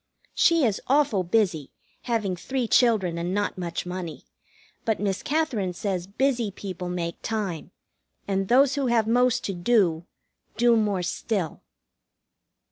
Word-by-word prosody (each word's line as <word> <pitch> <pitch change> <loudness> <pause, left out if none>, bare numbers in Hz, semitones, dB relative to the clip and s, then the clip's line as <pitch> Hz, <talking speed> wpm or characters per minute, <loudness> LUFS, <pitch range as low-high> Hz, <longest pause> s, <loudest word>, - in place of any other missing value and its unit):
She 335 -4 +4
is 215 -4 0
awful 270 -7 +3
busy, 175 -6 0 0.4
having 215 -6 0
three 255 +7 -2
children 210 -9 +3
and 175 +3 -2
not 205 0 -1
much 175 -2 -4
money; 180 -3 -6 0.6
but 220 -2 0
Miss 195 -2 -1
Katherine 250 - -1
says 185 -1 -3
busy 240 +1 0
people 185 -2 -6
make 170 -1 -4
time, 205 -7 -3 0.6
and 195 -1 0
those 265 +4 +5
who 280 -2 0
have 235 -2 +3
most 245 +2 +2
to 195 - -2
do, 175 -3 +1 0.5
do 240 +1 +5
more 205 -4 +1
still. 180 -2 -2
205 Hz, 135 wpm, -25 LUFS, 180-240 Hz, 0.6 s, those